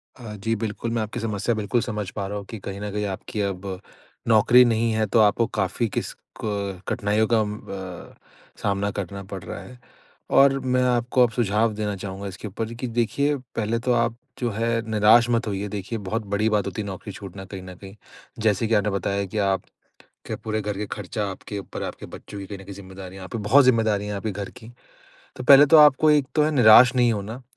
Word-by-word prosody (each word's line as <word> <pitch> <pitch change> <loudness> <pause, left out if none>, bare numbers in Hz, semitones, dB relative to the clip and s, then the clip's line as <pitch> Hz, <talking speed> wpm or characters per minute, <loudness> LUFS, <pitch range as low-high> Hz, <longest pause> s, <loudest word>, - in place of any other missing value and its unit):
अ, 115 -4 -9
जी 110 +3 -1
बिल्कुल। 110 +1 -4
मैं 115 -1 0
आपकी 110 +2 -4
समस्या 115 0 -1
बिल्कुल 110 +3 0
समझ 105 -3 -4
पा 100 - -4
रहा 105 +1 -4
हूँ 100 - -7
कि 115 - -6
कहीं 100 0 -7
न 105 - -4
कहीं 105 +1 -2
आपकी 100 +2 -4
अब, 95 -1 -4 0.5
नौकरी 115 +3 +6
नहीं 115 -1 +1
है, 110 0 +1
तो 115 - +2
आपको 110 +2 +4
काफ़ी 105 +4 0
किस - - -4 0.3
क 100 -3 -3
कठिनाइयों 105 -1 +1
का 115 0 +3
अम 105 0 -3
अ, 95 -2 -8 0.5
सामना 100 0 0
करना 100 0 -5
पड़ 95 0 -8
रहा - - -7
है। 125 0 -12 0.6
और 135 0 +6
मैं 125 -1 +1
आपको 125 0 +2
अब 120 - +3
सुझाव 110 -1 +1
देना 105 -1 -3
चाहूँगा 95 +1 -6
इसके 95 +2 -7
ऊपर, 110 +3 -5
कि 125 +2 -5
देखिए, 120 +5 0
पहले 115 -3 -3
तो 125 +2 -1
आप 115 -1 +1 0.2
जो 120 -2 0
है 115 +2 0
निराश 110 +3 +5
मत 115 -1 +1
होइए 100 0 -3
देखिए 105 +3 -5
बहुत 110 +3 -3
बड़ी 110 +2 +2
बात 105 -1 +1
होती 100 +3 -4
है - - -5
नौकरी 95 +2 -7
छूटना 95 0 -9
कहीं 95 -1 -8
न 90 0 -10
कहीं। 95 +2 -12 0.5
जैसे 110 +1 +2
कि 115 - 0
आपने 105 0 +2
बताया 100 +1 -1
कि 100 +3 -7
आप 95 -1 +1 0.7
के - - -4
पूरे 110 0 -3
घर 105 -1 -3
के 105 +1 -3
खर्चा 105 +1 -3
आपके 100 +2 -7
ऊपर 100 - -7
है, - - -2
आपके - - -9
बच्चों 100 - -10
की 100 - -7
कहीं 100 0 -8
न 95 - -11
कहीं 100 0 -9
ज़िम्मेदारियाँ 95 -1 -10
आप - - -11
पे 115 - -2
बहुत 140 +3 +7
ज़िम्मेदारियाँ 110 -4 +2
हैं 105 - -3
आपके 105 +2 -3
घर 100 0 -6
की। 120 -1 -12 0.6
तो 125 - -6
पहले 140 +2 +8
तो 160 +2 +6
आपको 150 0 +6
एक 145 -2 +3
तो 150 - +4
है 155 - +1
निराश 125 -1 +7
नहीं 120 -2 +4
होना, 110 +4 -5
105 Hz, 225 wpm, -24 LUFS, 100-115 Hz, 0.7 s, पहले